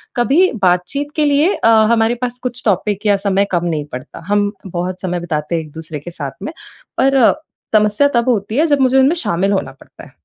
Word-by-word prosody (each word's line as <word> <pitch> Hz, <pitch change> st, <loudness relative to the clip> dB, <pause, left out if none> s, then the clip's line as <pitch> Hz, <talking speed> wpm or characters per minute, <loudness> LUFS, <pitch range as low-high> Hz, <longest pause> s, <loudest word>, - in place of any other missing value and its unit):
कभी 280 Hz, +10 st, +3 dB
बातचीत 185 Hz, +11 st, 0 dB
के 305 Hz, -, +2 dB
लिए 295 Hz, +6 st, +3 dB
अ, 225 Hz, -, +2 dB, 0.2 s
हमारे 230 Hz, 0 st, +2 dB
पास 245 Hz, 0 st, -3 dB
कुछ 250 Hz, 0 st, -4 dB
टॉपिक 205 Hz, 0 st, 0 dB
या 205 Hz, -1 st, +4 dB
समय 200 Hz, 0 st, +1 dB
कम 175 Hz, -1 st, 0 dB
नहीं 155 Hz, -4 st, -2 dB
पड़ता। 130 Hz, +1 st, -8 dB
हम 205 Hz, 0 st, +1 dB
बहुत 180 Hz, 0 st, -4 dB
समय 180 Hz, -2 st, -2 dB
बिताते 160 Hz, -1 st, -3 dB
हैं 165 Hz, -, -1 dB
एक-दूसरे 155 Hz, 0 st, -8 dB
के 175 Hz, +5 st, -9 dB
साथ 145 Hz, -6 st, -5 dB
में, -, -, -4 dB, 0.5 s
पर 270 Hz, +1 st, +3 dB, 0.6 s
समस्या 210 Hz, +6 st, +3 dB
तब 235 Hz, +1 st, +2 dB
होती 215 Hz, -1 st, -1 dB
है 310 Hz, -, +4 dB
जब 290 Hz, -2 st, +2 dB
मुझे 260 Hz, 0 st, +3 dB
उनमें 265 Hz, +4 st, +4 dB
शामिल 195 Hz, -, 0 dB
होना 190 Hz, -9 st, -1 dB
पड़ता 135 Hz, -, -16 dB
है। -, -, -14 dB
205 Hz, 205 wpm, -17 LUFS, 175-255 Hz, 0.6 s, या